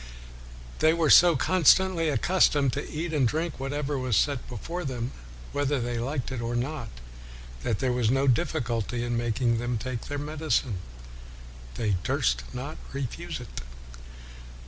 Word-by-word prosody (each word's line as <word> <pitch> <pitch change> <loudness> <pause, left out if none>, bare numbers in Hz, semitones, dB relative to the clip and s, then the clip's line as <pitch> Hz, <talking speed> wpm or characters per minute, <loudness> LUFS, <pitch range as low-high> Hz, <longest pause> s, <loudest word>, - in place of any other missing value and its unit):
They 160 +1 +5
were 165 -3 +2
so 175 -1 +8
constantly 180 +1 +4
accustomed 145 -4 +3
to - - -4
eat 160 +2 -3
and 140 -5 +3
drink 160 +4 -2
what 135 0 -3
was 140 -5 0
set 140 -4 0
before 165 +9 -5
them, 125 -3 -3 0.4
whether 145 -1 0
they 120 -1 -2
liked 130 +2 -3
it 125 -3 -3
or 115 +1 -2
not, 140 +6 -3 0.7
that 115 -4 -1
there 130 +1 0
was 120 -3 +1
no 135 +2 +2
difficulty 120 -2 0
in 120 0 -1
making 115 0 +1
them 120 0 -1
take 120 +1 -5
medicine: 145 - -1 1.0
"they 105 -5 0
durst - - +1
not 135 +5 -6 0.2
refuse 150 +5 -4
it.' 120 - -8
130 Hz, 145 wpm, -27 LUFS, 120-155 Hz, 1.0 s, so